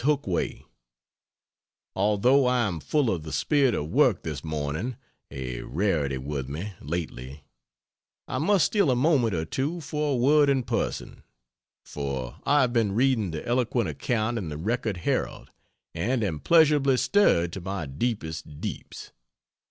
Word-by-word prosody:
HOOKWAY, 140 Hz, -, 0 dB, 1.3 s
Although 105 Hz, +7 st, +3 dB
I 125 Hz, -2 st, +2 dB
am 85 Hz, -4 st, -3 dB
full 140 Hz, -, +1 dB
of 85 Hz, -, -2 dB
the 80 Hz, 0 st, -8 dB
spirit 140 Hz, -6 st, +2 dB
of 75 Hz, +2 st, -3 dB
work -, -, +3 dB
this 75 Hz, -4 st, -5 dB
morning, 80 Hz, -, -3 dB, 0.3 s
a 65 Hz, -2 st, -5 dB
rarity 80 Hz, -8 st, 0 dB
with 70 Hz, 0 st, -4 dB
me 90 Hz, +9 st, -5 dB
lately 70 Hz, -3 st, -5 dB, 0.8 s
I 130 Hz, -, -2 dB
must 180 Hz, +1 st, +3 dB
steal 200 Hz, -8 st, +2 dB
a 125 Hz, -, +3 dB
moment 125 Hz, -, +2 dB
or 80 Hz, -1 st, -2 dB
two 145 Hz, -, -2 dB
for 150 Hz, -1 st, -2 dB
a -, -, +1 dB
word 145 Hz, +4 st, +4 dB
in 135 Hz, -2 st, +2 dB
person: 115 Hz, -1 st, -3 dB, 0.6 s
for 70 Hz, -4 st, -5 dB
I 145 Hz, 0 st, +5 dB
have 125 Hz, -2 st, +1 dB
been 110 Hz, -5 st, +2 dB
reading 120 Hz, -3 st, +2 dB
the 80 Hz, -2 st, -6 dB
eloquent 120 Hz, -4 st, +1 dB
account 110 Hz, -, -1 dB
in 90 Hz, -6 st, -5 dB
the 75 Hz, -, -5 dB
Record 110 Hz, +3 st, -2 dB
Herald 85 Hz, -, -2 dB, 0.4 s
and 115 Hz, +8 st, 0 dB
am 80 Hz, -7 st, -2 dB
pleasurably 150 Hz, -, +4 dB
stirred, 85 Hz, -, +3 dB
to 95 Hz, -, -5 dB
my 95 Hz, -2 st, -4 dB
deepest 80 Hz, -, -4 dB
deeps. -, -, -7 dB
105 Hz, 150 wpm, -26 LUFS, 80-130 Hz, 1.3 s, I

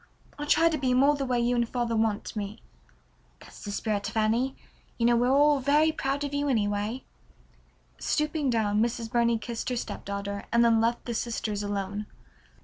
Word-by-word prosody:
I'll 295 Hz, -, -4 dB
try 330 Hz, +2 st, +5 dB
to 320 Hz, -2 st, 0 dB
be 255 Hz, -2 st, +1 dB
more 280 Hz, +3 st, +5 dB
the 275 Hz, -2 st, -3 dB
way 250 Hz, -1 st, +1 dB
you 240 Hz, +1 st, +1 dB
and 235 Hz, -1 st, 0 dB
father 240 Hz, -2 st, -1 dB
want 220 Hz, -1 st, -1 dB
me." 205 Hz, 0 st, -5 dB, 0.8 s
"That's -, -, -14 dB
the 205 Hz, -, -6 dB
right 205 Hz, -, -3 dB
spirit, 205 Hz, -2 st, -2 dB
Fanny. 225 Hz, +4 st, 0 dB, 0.4 s
You 230 Hz, -, +1 dB
know 240 Hz, 0 st, +5 dB
we're 240 Hz, +1 st, +2 dB
all 290 Hz, +1 st, +4 dB
very 295 Hz, +4 st, +3 dB
proud 280 Hz, -2 st, -2 dB
of 285 Hz, 0 st, -4 dB
you 285 Hz, 0 st, 0 dB
anyway." 210 Hz, +1 st, -1 dB, 1.0 s
Stooping 300 Hz, -2 st, 0 dB
down 215 Hz, -3 st, +1 dB
Mrs. 230 Hz, -1 st, -2 dB
Burney 235 Hz, -1 st, +2 dB
kissed 230 Hz, +2 st, -5 dB
her 250 Hz, -, -1 dB
stepdaughter, 200 Hz, -2 st, -5 dB
and 235 Hz, +1 st, +4 dB
then 225 Hz, -1 st, +4 dB
left 235 Hz, +1 st, 0 dB
the 240 Hz, -, -3 dB
sisters 220 Hz, -3 st, -2 dB
alone. 205 Hz, 0 st, -3 dB
235 Hz, 185 wpm, -27 LUFS, 215-270 Hz, 1.0 s, try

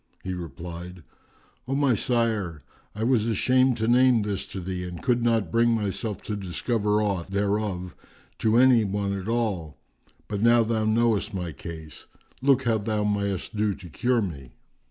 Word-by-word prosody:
He 95 Hz, -, -3 dB
replied, 85 Hz, +1 st, -8 dB, 0.6 s
"O 135 Hz, -, -1 dB
my 140 Hz, -3 st, +3 dB
sire, 110 Hz, -, -1 dB, 0.3 s
I 110 Hz, -, -3 dB
was 115 Hz, -2 st, +2 dB
ashamed 130 Hz, +3 st, +3 dB
to 110 Hz, 0 st, -1 dB
name 125 Hz, -2 st, +5 dB
this 100 Hz, -2 st, -3 dB
to 95 Hz, -, -6 dB
thee 90 Hz, 0 st, -4 dB
and 90 Hz, -1 st, -6 dB
could 125 Hz, -2 st, +2 dB
not 115 Hz, -7 st, +1 dB
bring 115 Hz, 0 st, +3 dB
myself 105 Hz, 0 st, -3 dB
to 105 Hz, -, -3 dB
discover 105 Hz, +2 st, 0 dB
aught 100 Hz, -5 st, -1 dB
thereof 100 Hz, -2 st, -1 dB, 0.4 s
to 110 Hz, +1 st, +3 dB
any 125 Hz, -2 st, +6 dB
one 100 Hz, 0 st, -1 dB
at 100 Hz, 0 st, -5 dB
all; 105 Hz, -10 st, -1 dB, 0.5 s
but 100 Hz, -1 st, -3 dB
now 115 Hz, +1 st, +5 dB
thou 110 Hz, -1 st, 0 dB
knowest 110 Hz, -2 st, +1 dB
my 90 Hz, -3 st, -3 dB
case, 80 Hz, +1 st, -10 dB, 0.3 s
look 135 Hz, -1 st, +3 dB
how 115 Hz, -2 st, +1 dB
thou 105 Hz, 0 st, -1 dB
mayest 100 Hz, 0 st, -2 dB
do 105 Hz, -2 st, +1 dB
to 90 Hz, -3 st, -12 dB
cure 120 Hz, +7 st, +1 dB
me." 70 Hz, -9 st, -7 dB
105 Hz, 165 wpm, -26 LUFS, 90-115 Hz, 0.6 s, any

